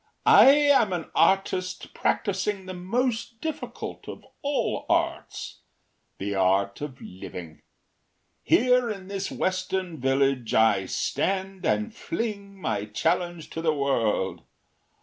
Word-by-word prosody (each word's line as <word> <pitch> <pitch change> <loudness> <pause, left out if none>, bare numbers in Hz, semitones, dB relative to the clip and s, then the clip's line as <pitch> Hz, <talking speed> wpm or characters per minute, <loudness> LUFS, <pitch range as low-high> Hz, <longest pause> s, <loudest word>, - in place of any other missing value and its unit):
“I - - +8
am 280 -8 +5
an 175 -3 -4
artist 185 +1 +1
practising 200 -1 -1
the 185 - -6
most 230 +5 -2
difficult 315 +3 -6
of - - -9 0.2
all 285 0 -1
arts - - -1 0.6
the 100 +1 -3
art 95 +2 +1
of 145 -3 -6
living. 90 -3 -9 0.8
Here 250 0 +3
in 195 -3 -6
this 195 -1 -3
western 185 -3 -2
village 135 -2 +1
I 105 -4 +4
stand 190 - -1
and 215 +1 0
fling 200 -4 -4
my 105 - -2
challenge 170 +9 -1
to 165 - -4
the 160 -2 +1
world. 110 - 0
185 Hz, 115 wpm, -26 LUFS, 125-205 Hz, 0.8 s, I